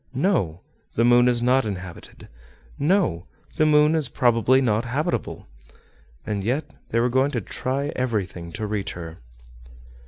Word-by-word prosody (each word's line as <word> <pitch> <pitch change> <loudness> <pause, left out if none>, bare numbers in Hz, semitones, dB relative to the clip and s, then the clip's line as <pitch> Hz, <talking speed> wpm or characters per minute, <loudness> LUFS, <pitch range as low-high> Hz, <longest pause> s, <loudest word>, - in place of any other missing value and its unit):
No! 125 - 0 0.3
the 115 - +3
moon 120 0 +5
is 120 -1 +1
not 130 +2 +3
inhabited; 95 -4 -8 0.5
no! 145 - +1 0.3
the 155 - +4
moon 150 0 +5
is 155 -5 0
probably 120 +1 +3
not 115 -4 +1
habitable. 130 +6 -3 0.8
And 105 -2 -3
yet 135 +8 -1 0.2
they 115 - +1
were 120 - +3
going 130 +3 +2
to 125 - -2
try 135 +8 -3
everything 100 -9 -3
to 110 0 -4
reach 100 -1 -3
her. 85 -1 -9
120 Hz, 145 wpm, -23 LUFS, 100-135 Hz, 0.8 s, moon